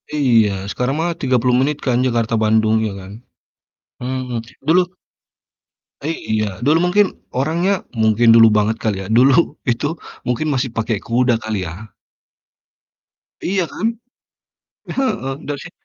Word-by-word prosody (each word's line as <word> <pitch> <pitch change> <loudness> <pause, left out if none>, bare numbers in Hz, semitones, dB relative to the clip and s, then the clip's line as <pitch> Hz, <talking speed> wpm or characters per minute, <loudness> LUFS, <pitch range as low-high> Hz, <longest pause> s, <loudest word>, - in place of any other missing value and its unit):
Iya, 115 -8 +3 0.2
sekarang 125 +3 -1
mah 170 +2 0
30 125 -1 +2
menit 140 +3 +1
kan, 125 -3 +2
Jakarta 115 -2 0
Bandung, 110 0 +3
iya 110 - -1
kan? 95 0 -11 0.9
Mhm, 125 -1 -3 0.3
dulu 175 +3 +6 1.2
Iya, 110 - -2
dulu 150 +3 +4
mungkin 205 +3 +4 0.3
orangnya 170 +8 0
mungkin 115 0 +4
dulu 115 0 +8
banget 105 +1 +1
kali 100 -3 -2
ya - - -8
dulu 135 +6 +4
itu 120 +4 0 0.4
mungkin 125 +6 -1
masih 130 0 -1
pakai 115 -1 -1
kuda 120 +3 +1
kali 110 -4 -3
ya? 100 +6 -10 1.5
Iya 190 0 0
kan? - - -4 1.1
Heeh, 135 - -1
dari 145 -1 -3
si 175 - -10
125 Hz, 130 wpm, -19 LUFS, 110-145 Hz, 1.5 s, dulu